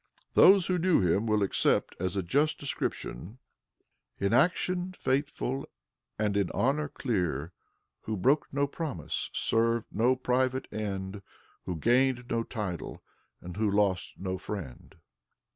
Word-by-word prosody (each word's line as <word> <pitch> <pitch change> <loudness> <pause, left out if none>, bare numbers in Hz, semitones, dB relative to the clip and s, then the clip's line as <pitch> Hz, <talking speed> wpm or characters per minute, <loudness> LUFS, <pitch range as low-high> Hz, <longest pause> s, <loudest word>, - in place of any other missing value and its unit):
Those 195 -2 +7
who 180 -1 0
knew 180 0 +4
him 95 +5 +2
will 105 -1 +2
accept 100 - +1
as 90 +1 -2
a 95 - 0
just 145 - +1
description: 110 - -4 0.8
"In 100 +1 +1
action 180 +6 +2
faithful, 135 -3 -2 0.5
and 105 -2 0
in 100 -3 +1
honor 145 +4 +1
clear, 90 - -2 0.5
Who 110 -1 -2
broke 135 +10 +2
no 140 +1 +1
promise, 140 - -4
served 115 0 +1
no 120 +5 +3
private 130 +1 0
end, 100 -2 -4 0.4
Who 90 - -3
gained 125 - +2
no 115 0 +1
title, 105 -7 -5 0.4
and 90 +2 -8
who 110 -1 +2
lost 100 -2 +1
no 95 -1 -3
friend." 90 -11 -7
115 Hz, 130 wpm, -29 LUFS, 95-135 Hz, 0.8 s, Those